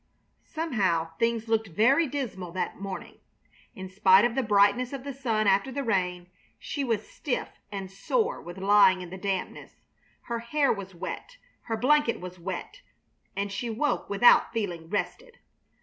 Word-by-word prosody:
Somehow 195 Hz, -, 0 dB
things 230 Hz, -1 st, 0 dB
looked 225 Hz, -1 st, +1 dB
very 245 Hz, -, +3 dB
dismal 235 Hz, -11 st, -4 dB
that 185 Hz, -, -3 dB
morning, 195 Hz, -1 st, -7 dB, 0.6 s
in 190 Hz, 0 st, -7 dB
spite 190 Hz, +2 st, +5 dB
of 240 Hz, -, 0 dB
the 265 Hz, -, +1 dB
brightness 210 Hz, +3 st, +3 dB
of 270 Hz, -2 st, -5 dB
the 280 Hz, 0 st, -5 dB
sun 230 Hz, -5 st, 0 dB
after 200 Hz, +6 st, +3 dB
the 280 Hz, +2 st, -3 dB
rain. 180 Hz, -6 st, -1 dB, 0.3 s
She 285 Hz, -, -4 dB
was 225 Hz, -4 st, -1 dB
stiff 280 Hz, -6 st, -3 dB, 0.2 s
and 195 Hz, -2 st, -6 dB
sore 460 Hz, -, -1 dB
with 175 Hz, +1 st, -9 dB
lying 195 Hz, -1 st, +5 dB
in 180 Hz, -1 st, -9 dB
the 190 Hz, -, -7 dB
dampness. 195 Hz, -1 st, -4 dB, 0.5 s
Her 235 Hz, -1 st, -3 dB
hair 275 Hz, +5 st, +1 dB
was 195 Hz, -3 st, -8 dB
wet, -, -, -7 dB, 0.3 s
her 225 Hz, -, 0 dB
blanket 260 Hz, +1 st, +3 dB
was 180 Hz, 0 st, -9 dB
wet, 190 Hz, -, -6 dB, 0.5 s
and 200 Hz, 0 st, -2 dB
she 235 Hz, +4 st, -3 dB
woke 255 Hz, +7 st, -1 dB
without 200 Hz, +4 st, +5 dB
feeling 180 Hz, -8 st, -4 dB
rested. 475 Hz, -, -4 dB
215 Hz, 160 wpm, -27 LUFS, 190-255 Hz, 0.6 s, spite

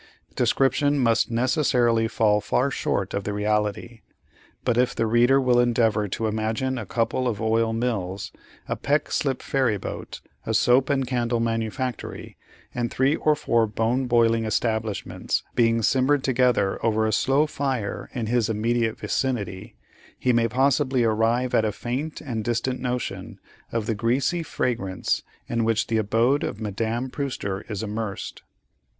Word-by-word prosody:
Description 145 Hz, +2 st, +2 dB
must 115 Hz, -4 st, +2 dB
necessarily 120 Hz, -2 st, +2 dB
fall 105 Hz, -2 st, +2 dB
far 135 Hz, +6 st, +1 dB
short 100 Hz, -6 st, -1 dB
of 100 Hz, -, -2 dB
the 105 Hz, -, -3 dB
reality, 105 Hz, +2 st, -1 dB, 0.6 s
but 120 Hz, -, +2 dB
if 125 Hz, +1 st, +2 dB
the 115 Hz, -, +1 dB
reader 120 Hz, +4 st, +4 dB
will 125 Hz, -2 st, +3 dB
endeavor 115 Hz, -3 st, +2 dB
to 110 Hz, +4 st, -3 dB
imagine 110 Hz, +4 st, -1 dB
a 110 Hz, -, -7 dB
couple 120 Hz, +4 st, 0 dB
of 110 Hz, -4 st, -2 dB
oil 110 Hz, 0 st, +1 dB
mills, 110 Hz, -5 st, -2 dB, 0.4 s
a -, -, -1 dB
Peck 145 Hz, +2 st, 0 dB
slip 135 Hz, -3 st, -1 dB
ferry 130 Hz, -6 st, +1 dB
boat, -, -, -7 dB, 0.2 s
a -, -, -1 dB
soap 130 Hz, +3 st, +4 dB
and 135 Hz, -2 st, +1 dB
candle 120 Hz, -2 st, 0 dB
manufactory, 115 Hz, +2 st, -3 dB, 0.4 s
and 120 Hz, -1 st, -1 dB
three 135 Hz, +4 st, +2 dB
or 155 Hz, -1 st, +2 dB
four 115 Hz, -6 st, +1 dB
bone 115 Hz, +5 st, 0 dB
boiling 115 Hz, -1 st, +3 dB
establishments 110 Hz, -1 st, -1 dB
being 115 Hz, -1 st, +2 dB
simmered 135 Hz, +4 st, +2 dB
together 125 Hz, -6 st, +1 dB
over 110 Hz, -1 st, +2 dB
a 110 Hz, -, 0 dB
slow 135 Hz, +3 st, +3 dB
fire 135 Hz, -8 st, -3 dB
in 120 Hz, -3 st, -3 dB
his 115 Hz, -1 st, +1 dB
immediate 110 Hz, +1 st, 0 dB
vicinity, 110 Hz, -4 st, -3 dB, 0.4 s
he 125 Hz, -, +1 dB
may 115 Hz, 0 st, +3 dB
possibly 135 Hz, +1 st, +2 dB
arrive 115 Hz, +3 st, +1 dB
at 110 Hz, -, +4 dB
a 110 Hz, -, +1 dB
faint 130 Hz, +9 st, -4 dB
and 115 Hz, -7 st, -4 dB
distant 120 Hz, +3 st, -1 dB
notion 125 Hz, 0 st, -4 dB, 0.3 s
of 115 Hz, -2 st, -1 dB
the 110 Hz, -, 0 dB
greasy 125 Hz, +10 st, 0 dB
fragrance 115 Hz, -, -1 dB, 0.3 s
in 115 Hz, -1 st, 0 dB
which 110 Hz, -1 st, +1 dB
the 115 Hz, -, 0 dB
abode 115 Hz, +6 st, +2 dB
of 105 Hz, -, -4 dB
Madame 115 Hz, +4 st, -2 dB
Prewster 125 Hz, -9 st, -3 dB
is 105 Hz, -1 st, -3 dB
immersed. 105 Hz, -2 st, -5 dB
115 Hz, 150 wpm, -24 LUFS, 110-130 Hz, 0.6 s, reader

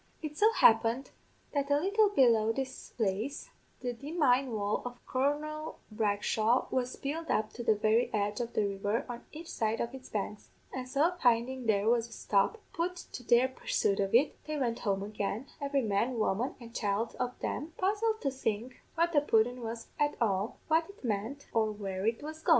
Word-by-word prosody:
"Now, 310 Hz, -, -1 dB
it -, -, -17 dB
so 430 Hz, +7 st, +5 dB
happened 230 Hz, -, +4 dB, 0.4 s
that 285 Hz, -1 st, 0 dB
a 285 Hz, -, +4 dB
little 405 Hz, +6 st, +3 dB
below 230 Hz, -, +4 dB
this 260 Hz, +2 st, -5 dB
place, 225 Hz, -, -2 dB, 0.3 s
the 245 Hz, -2 st, -2 dB
demesne 275 Hz, -1 st, +2 dB
wall 210 Hz, -1 st, 0 dB
of 245 Hz, 0 st, -6 dB
Colonel 300 Hz, +4 st, -1 dB
Bragshaw 215 Hz, +2 st, +1 dB
was 255 Hz, -1 st, -1 dB
built 320 Hz, +4 st, -4 dB
up 215 Hz, 0 st, 0 dB
to 240 Hz, -, -6 dB
the 220 Hz, -2 st, +4 dB
very 220 Hz, +3 st, +2 dB
edge 205 Hz, 0 st, 0 dB
of 240 Hz, -1 st, -3 dB
the 210 Hz, -, +2 dB
river 205 Hz, +6 st, -1 dB
on 245 Hz, -1 st, -7 dB
each 320 Hz, +2 st, -9 dB
side 225 Hz, -5 st, -1 dB
of 235 Hz, +2 st, -2 dB
its 265 Hz, -1 st, -10 dB
banks; 210 Hz, 0 st, -4 dB, 0.2 s
and 255 Hz, -1 st, -5 dB
so 290 Hz, +6 st, +3 dB
findin' 245 Hz, +1 st, +2 dB
there 205 Hz, -1 st, +2 dB
was 235 Hz, 0 st, +2 dB
a -, -, -11 dB
stop 200 Hz, -, +1 dB, 0.2 s
put 360 Hz, 0 st, -1 dB, 0.2 s
to -, -, -6 dB
their 240 Hz, +1 st, +4 dB
pursuit 210 Hz, -5 st, 0 dB
of 195 Hz, +2 st, +1 dB
it, 275 Hz, +5 st, +4 dB
they 305 Hz, 0 st, -3 dB
went 240 Hz, -4 st, 0 dB
home 195 Hz, -2 st, 0 dB
again, 210 Hz, +3 st, -3 dB, 0.2 s
every 280 Hz, -1 st, +1 dB
man, 225 Hz, +4 st, 0 dB
woman, 220 Hz, +4 st, 0 dB
and 230 Hz, -1 st, -11 dB
child 210 Hz, +1 st, -1 dB
of 250 Hz, 0 st, -2 dB
them, 310 Hz, +4 st, -3 dB
puzzled 430 Hz, +3 st, +1 dB
to 275 Hz, -, 0 dB
think 245 Hz, -1 st, -3 dB
what 335 Hz, +1 st, +2 dB
the 290 Hz, -, +5 dB
pudden 245 Hz, -2 st, +2 dB
was 230 Hz, 0 st, -5 dB
at 295 Hz, 0 st, +2 dB
all, 205 Hz, -1 st, 0 dB
what 325 Hz, +2 st, +2 dB
it 400 Hz, -, -14 dB
meant, 230 Hz, +5 st, -2 dB
or 220 Hz, -1 st, +2 dB
where 195 Hz, -1 st, -3 dB
it 230 Hz, +5 st, 0 dB
was 310 Hz, +1 st, -6 dB
goin'! -, -, -3 dB
245 Hz, 195 wpm, -31 LUFS, 215-285 Hz, 0.4 s, so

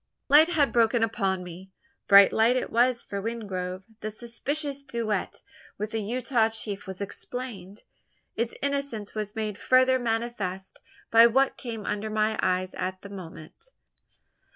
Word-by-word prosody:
Light 300 Hz, +3 st, +7 dB
had 300 Hz, -5 st, +2 dB
broken 230 Hz, 0 st, +3 dB
upon 195 Hz, -4 st, 0 dB
me 180 Hz, +2 st, -10 dB, 0.4 s
bright 200 Hz, -1 st, +8 dB
light 230 Hz, +3 st, +4 dB
it 255 Hz, -, -2 dB
was 240 Hz, +1 st, +2 dB
for 200 Hz, 0 st, -5 dB
Wingrove! 190 Hz, -5 st, -4 dB, 0.2 s
The 215 Hz, -, -4 dB
suspicious 275 Hz, +6 st, -3 dB
duetto 225 Hz, -7 st, -3 dB, 0.4 s
with 210 Hz, +1 st, -4 dB
the 225 Hz, -, -2 dB
Utah 235 Hz, +1 st, +1 dB
chief 210 Hz, -3 st, -4 dB
was 190 Hz, 0 st, -7 dB
explained. 205 Hz, -2 st, -7 dB, 0.5 s
Its 235 Hz, 0 st, -2 dB
innocence 280 Hz, -7 st, -2 dB
was 215 Hz, 0 st, -4 dB
made 215 Hz, -2 st, -3 dB
further 255 Hz, 0 st, +4 dB
manifest, 225 Hz, -5 st, -3 dB, 0.3 s
by 230 Hz, +1 st, +8 dB
what 265 Hz, +3 st, +2 dB
came 225 Hz, -5 st, -6 dB
under 210 Hz, +1 st, -2 dB
my 215 Hz, 0 st, 0 dB
eyes 185 Hz, 0 st, 0 dB
at 185 Hz, 0 st, -4 dB
the 200 Hz, -, -9 dB
moment. 185 Hz, -, -10 dB
220 Hz, 145 wpm, -27 LUFS, 195-245 Hz, 0.5 s, bright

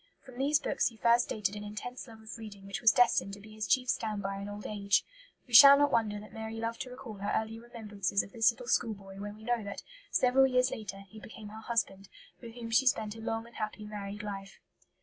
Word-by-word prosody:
From 255 Hz, -2 st, -12 dB
these 290 Hz, +2 st, +3 dB
books 280 Hz, -, 0 dB
he 230 Hz, -, -7 dB
first 235 Hz, +2 st, +3 dB
dated 205 Hz, -1 st, -1 dB
an 205 Hz, -, -6 dB
intense 210 Hz, +5 st, -7 dB
love 225 Hz, -1 st, -13 dB
of 220 Hz, -, -9 dB
reading 205 Hz, -3 st, -10 dB
which 195 Hz, 0 st, -5 dB
was 225 Hz, -2 st, +7 dB
destined 215 Hz, -4 st, +3 dB
to 200 Hz, -, -8 dB
be 215 Hz, +1 st, -13 dB
his 215 Hz, -2 st, -4 dB
chief 255 Hz, +4 st, +2 dB
stand 215 Hz, -5 st, -1 dB
by 195 Hz, 0 st, -3 dB
in 200 Hz, -, -6 dB
old 205 Hz, 0 st, -8 dB
age. 200 Hz, -1 st, +1 dB, 0.4 s
We 245 Hz, -, -15 dB
shall 280 Hz, +3 st, +11 dB
not 290 Hz, 0 st, +3 dB
wonder 215 Hz, -4 st, +1 dB
that 210 Hz, +1 st, -13 dB
Mary 220 Hz, 0 st, -6 dB
loved 230 Hz, +1 st, -3 dB
to 255 Hz, -, -5 dB
recall 240 Hz, -4 st, -9 dB
her 200 Hz, +1 st, -3 dB
early 220 Hz, +1 st, -2 dB
remembrances 210 Hz, -5 st, -2 dB
of -, -, -13 dB
this 225 Hz, 0 st, +4 dB
little 245 Hz, +1 st, -5 dB
school 225 Hz, -2 st, +1 dB
boy 195 Hz, -1 st, -12 dB
when 205 Hz, +1 st, -6 dB
we 215 Hz, -, -15 dB
know 240 Hz, -1 st, 0 dB
that, 200 Hz, 0 st, -7 dB, 0.3 s
several 260 Hz, +1 st, +4 dB
years 255 Hz, 0 st, +2 dB
later, 195 Hz, -3 st, -6 dB
he 220 Hz, +3 st, -12 dB
became 215 Hz, 0 st, -10 dB
her 220 Hz, +1 st, -9 dB
husband, 200 Hz, -4 st, -2 dB, 0.3 s
with 230 Hz, -2 st, -10 dB
whom 230 Hz, -2 st, -7 dB
she 250 Hz, +3 st, +4 dB
spent 215 Hz, -3 st, +1 dB
a -, -, -10 dB
long 225 Hz, 0 st, -3 dB
and 235 Hz, -, -14 dB
happy 215 Hz, -1 st, -4 dB
married 205 Hz, 0 st, -6 dB
life. 195 Hz, -1 st, -7 dB
220 Hz, 245 wpm, -31 LUFS, 205-235 Hz, 0.4 s, shall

